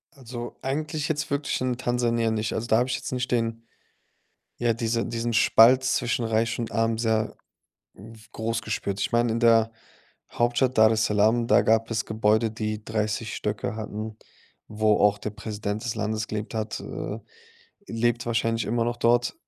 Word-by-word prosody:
Also, 120 Hz, -2 st, -8 dB
eigentlich 150 Hz, +2 st, -2 dB
jetzt 150 Hz, -1 st, -2 dB
wirklich 140 Hz, -1 st, -1 dB
in 125 Hz, -1 st, -1 dB
Tansania 120 Hz, -2 st, 0 dB
nicht. 110 Hz, 0 st, -1 dB
Also, 115 Hz, -, -3 dB
da 110 Hz, -, +4 dB
habe 125 Hz, +2 st, +1 dB
ich -, -, 0 dB
jetzt -, -, -5 dB
nicht 125 Hz, -1 st, -2 dB
den 115 Hz, -1 st, -1 dB, 1.0 s
ja, 120 Hz, -1 st, +1 dB
diese 115 Hz, 0 st, -1 dB
diesen 115 Hz, 0 st, -2 dB
Spalt 115 Hz, +3 st, +6 dB
zwischen 120 Hz, -2 st, 0 dB
Reich 115 Hz, +1 st, 0 dB
und 115 Hz, -2 st, -3 dB
Arm 115 Hz, 0 st, 0 dB
sehr 110 Hz, -1 st, 0 dB, 0.6 s
w 110 Hz, +3 st, -13 dB
groß 115 Hz, 0 st, -2 dB
gespürt. 100 Hz, -2 st, -3 dB
Ich -, -, -1 dB
meine 120 Hz, 0 st, +2 dB
in 115 Hz, -, 0 dB
der 115 Hz, -1 st, +4 dB, 0.6 s
Hauptstadt 120 Hz, +2 st, +1 dB
Daressalam, 110 Hz, +1 st, +4 dB
da -, -, +5 dB
gab 115 Hz, +1 st, +2 dB
es 110 Hz, -1 st, -1 dB
Gebäude, 110 Hz, +1 st, +2 dB
die 110 Hz, 0 st, -4 dB
30 110 Hz, 0 st, -2 dB
Stöcke 105 Hz, +1 st, -3 dB
hatten, 110 Hz, 0 st, -5 dB, 0.5 s
wo 105 Hz, 0 st, +2 dB
auch 105 Hz, 0 st, +3 dB
der 105 Hz, +1 st, -4 dB
Präsident 105 Hz, +1 st, -5 dB
des 120 Hz, -, -2 dB
Landes 110 Hz, 0 st, -2 dB
gelebt 105 Hz, +1 st, -5 dB
hat, 110 Hz, 0 st, -3 dB
äh, -, -, -6 dB, 0.7 s
lebt 120 Hz, +1 st, 0 dB
wahrscheinlich 115 Hz, -1 st, 0 dB
immer 115 Hz, 0 st, 0 dB
noch 120 Hz, 0 st, -2 dB
dort. 120 Hz, +1 st, +2 dB
115 Hz, 165 wpm, -25 LUFS, 110-120 Hz, 1.0 s, Spalt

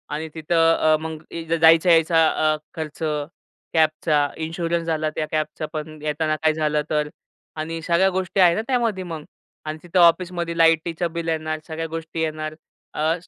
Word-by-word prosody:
आणि 160 Hz, +1 st, -4 dB
तिथं 165 Hz, +1 st, +3 dB
अ, 155 Hz, 0 st, +3 dB
मग 160 Hz, -1 st, -5 dB
इ 165 Hz, -, -5 dB
द 165 Hz, 0 st, +1 dB
जायच-यायचा 165 Hz, 0 st, +5 dB, 0.3 s
अ, -, -, -2 dB, 0.2 s
खर्च, 155 Hz, -2 st, -6 dB, 0.7 s
कॅबचा, 155 Hz, -2 st, +2 dB
इन्शुरन्स 165 Hz, +1 st, -2 dB
झाला, 155 Hz, -1 st, 0 dB
त्या 155 Hz, -, -1 dB
कॅबचा 155 Hz, 0 st, -2 dB
पण 155 Hz, 0 st, -6 dB
येताना 155 Hz, +1 st, -1 dB
काही 155 Hz, 0 st, +1 dB
झालं 150 Hz, -1 st, 0 dB
तर 150 Hz, -1 st, 0 dB, 0.5 s
आणि 160 Hz, +1 st, -4 dB
सगळ्या 175 Hz, +4 st, +3 dB
गोष्टी 190 Hz, +1 st, -2 dB
आहे 175 Hz, -2 st, +6 dB
ना -, -, 0 dB
त्यामध्ये 230 Hz, -7 st, 0 dB
मग? 165 Hz, -4 st, -6 dB, 0.4 s
अन् 155 Hz, 0 st, -4 dB
तिथं 175 Hz, +1 st, 0 dB
ऑफिसमध्ये 170 Hz, 0 st, +3 dB
लाईटीचं 165 Hz, +1 st, +2 dB
बिल 170 Hz, -1 st, -4 dB
येणार, 155 Hz, -1 st, -2 dB
सगळ्या 165 Hz, 0 st, -4 dB
गोष्टी 165 Hz, 0 st, -5 dB
येणार, 155 Hz, -1 st, -3 dB, 0.4 s
अ, 155 Hz, +2 st, +1 dB
160 Hz, 165 wpm, -22 LUFS, 155-170 Hz, 0.7 s, आहे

